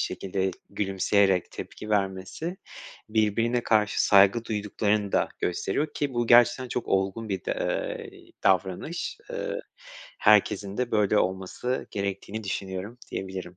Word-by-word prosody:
şekilde 95 Hz, 0 st, -1 dB, 0.2 s
gülümseyerek 95 Hz, -1 st, +2 dB
tepki 105 Hz, -, -8 dB
vermesi 100 Hz, -, -1 dB, 0.5 s
birbirine 115 Hz, +3 st, +1 dB
karşı 105 Hz, -2 st, +2 dB
saygı 100 Hz, +3 st, +5 dB
duyduklarını 105 Hz, -1 st, 0 dB
da -, -, +2 dB
gösteriyor 95 Hz, -, -1 dB
ki 140 Hz, -3 st, -2 dB
bu 120 Hz, 0 st, 0 dB
gerçekten 120 Hz, +2 st, +5 dB
çok 125 Hz, -, -3 dB
olgun 95 Hz, +3 st, 0 dB
bir 95 Hz, -2 st, -3 dB
de, -, -, 0 dB, 0.6 s
eee, -, -, -17 dB
davranış. 95 Hz, -, 0 dB
Iıı, -, -, -3 dB, 0.6 s
herkesin 100 Hz, -1 st, +3 dB
de 125 Hz, -1 st, -1 dB
böyle 105 Hz, -1 st, +3 dB
olması 95 Hz, +8 st, -2 dB
gerektiğini 100 Hz, +2 st, -4 dB
düşünüyorum 95 Hz, +4 st, -4 dB
diyebilirim. 95 Hz, -2 st, -5 dB
105 Hz, 120 wpm, -27 LUFS, 95-115 Hz, 0.6 s, saygı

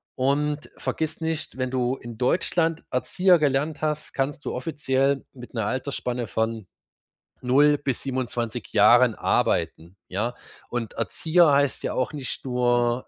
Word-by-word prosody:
Und 145 Hz, +3 st, 0 dB
vergiss 160 Hz, 0 st, -3 dB
nicht, 160 Hz, -4 st, -3 dB
wenn 130 Hz, -1 st, -2 dB
du 125 Hz, 0 st, 0 dB
in 120 Hz, -2 st, -9 dB
Deutschland 165 Hz, +4 st, +1 dB
Erzieher 180 Hz, +7 st, +3 dB
gelernt 145 Hz, +1 st, 0 dB
hast, 155 Hz, -1 st, -2 dB
kannst 140 Hz, +2 st, -2 dB
du -, -, -2 dB
offiziell 135 Hz, -1 st, 0 dB
mit 125 Hz, -2 st, -12 dB
'ner 110 Hz, -2 st, 0 dB
Altersspanne 125 Hz, -1 st, -2 dB
von 110 Hz, -1 st, -2 dB, 0.7 s
0 145 Hz, +4 st, +4 dB
bis 140 Hz, -3 st, -3 dB
27 125 Hz, -4 st, -3 dB
Jahren -, -, +6 dB
arbeiten, 85 Hz, +4 st, 0 dB
ja. 110 Hz, +6 st, -2 dB, 0.4 s
Und 120 Hz, -3 st, -3 dB
Erzieher 165 Hz, +8 st, +2 dB
heißt 140 Hz, -1 st, +2 dB
ja -, -, -2 dB
auch 130 Hz, +4 st, -1 dB
nicht 140 Hz, -3 st, -5 dB
nur, 120 Hz, -1 st, +1 dB
130 Hz, 140 wpm, -25 LUFS, 120-150 Hz, 0.7 s, Jahren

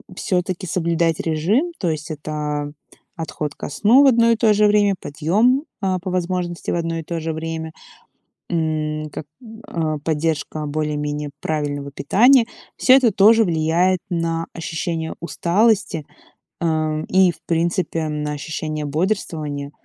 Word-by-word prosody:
всё-таки 180 Hz, -1 st, -2 dB
соблюдать 170 Hz, -1 st, 0 dB
режим. 190 Hz, -, +1 dB
То 175 Hz, -, 0 dB
есть 155 Hz, +1 st, -5 dB
это 150 Hz, -1 st, -4 dB, 0.4 s
отход 155 Hz, -2 st, -4 dB
ко -, -, -6 dB
сну 215 Hz, -, +5 dB
в -, -, +6 dB
одно 230 Hz, -2 st, +5 dB
и 230 Hz, -, +4 dB
то 220 Hz, -2 st, +4 dB
же 210 Hz, +1 st, +4 dB
время, 205 Hz, -1 st, +3 dB
подъём, 210 Hz, -, +1 dB, 0.2 s
а, 185 Hz, -2 st, 0 dB
по 185 Hz, +1 st, -5 dB
возможности 180 Hz, -1 st, -2 dB
в -, -, 0 dB
одно 165 Hz, -1 st, -2 dB
и -, -, -6 dB
то 165 Hz, +1 st, -4 dB
же 160 Hz, 0 st, -3 dB
время, 160 Hz, 0 st, -4 dB, 0.8 s
м, 155 Hz, -2 st, -1 dB
как, 145 Hz, -, -7 dB, 0.4 s
а, 155 Hz, -3 st, -2 dB
поддержка 155 Hz, 0 st, -2 dB
более-менее 150 Hz, 0 st, -2 dB
правильного 145 Hz, -2 st, -2 dB
питания. 235 Hz, -, +4 dB, 0.3 s
Всё 255 Hz, -, +5 dB
это 250 Hz, -4 st, +4 dB
тоже 220 Hz, +3 st, +6 dB
влияет 170 Hz, +2 st, +2 dB
на 165 Hz, -1 st, -1 dB
ощущение 165 Hz, -1 st, -3 dB
усталости, 180 Hz, -1 st, +1 dB, 0.5 s
э, 155 Hz, -2 st, 0 dB
и 185 Hz, -1 st, +5 dB
в 160 Hz, -, -21 dB
принципе 165 Hz, -1 st, 0 dB
на 150 Hz, 0 st, -3 dB
ощущение 155 Hz, 0 st, -4 dB
бодрствования, 155 Hz, -4 st, -2 dB
165 Hz, 140 wpm, -21 LUFS, 155-185 Hz, 0.8 s, в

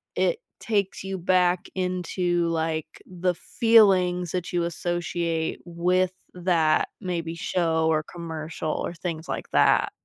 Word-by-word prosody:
it -, -, +1 dB, 0.2 s
takes 200 Hz, -4 st, -1 dB
you 190 Hz, 0 st, -4 dB
back 180 Hz, 0 st, +2 dB
into, 180 Hz, -1 st, 0 dB
like, 160 Hz, -1 st, -2 dB
the 180 Hz, 0 st, -1 dB, 0.3 s
feelings 185 Hz, -6 st, +5 dB
that 180 Hz, 0 st, -3 dB
you 175 Hz, -1 st, +1 dB
associate 170 Hz, -1 st, -2 dB
with 180 Hz, +2 st, +1 dB, 0.2 s
that, 170 Hz, -4 st, +2 dB
maybe, 170 Hz, -3 st, -3 dB
show, 165 Hz, -2 st, 0 dB
or 155 Hz, -1 st, +2 dB
commercial, 160 Hz, -2 st, -5 dB
or -, -, -3 dB
things 165 Hz, -1 st, -5 dB
like -, -, -4 dB
that. -, -, +4 dB
175 Hz, 125 wpm, -25 LUFS, 165-185 Hz, 0.3 s, feelings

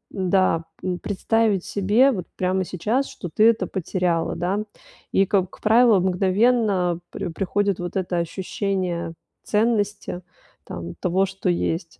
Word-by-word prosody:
да, 185 Hz, -3 st, +2 dB, 0.2 s
м, 180 Hz, -1 st, -2 dB
представить 210 Hz, -1 st, 0 dB
себе 210 Hz, +7 st, +3 dB
вот 185 Hz, -8 st, -4 dB
прямо 185 Hz, +1 st, +1 dB
сейчас, 220 Hz, +11 st, -1 dB
что 175 Hz, -, -7 dB
ты 220 Hz, +2 st, +6 dB
это 230 Hz, -, +1 dB
потеряла, 180 Hz, -2 st, -1 dB
да. 180 Hz, +4 st, -1 dB, 0.5 s
И, 195 Hz, -, +3 dB
как 190 Hz, -1 st, -1 dB
правило, 225 Hz, -1 st, +5 dB
мгновенно 190 Hz, 0 st, +2 dB
при -, -, -4 dB
приходит 195 Hz, +3 st, -1 dB
вот 175 Hz, -1 st, -5 dB
это 180 Hz, -1 st, -1 dB
ощущение 180 Hz, -1 st, -2 dB, 0.3 s
ценности, 210 Hz, -4 st, 0 dB, 0.4 s
там, 85 Hz, 0 st, -7 dB
того, 185 Hz, +2 st, +2 dB
что 190 Hz, 0 st, -3 dB
есть. 165 Hz, -1 st, -2 dB
190 Hz, 130 wpm, -23 LUFS, 175-210 Hz, 0.5 s, ты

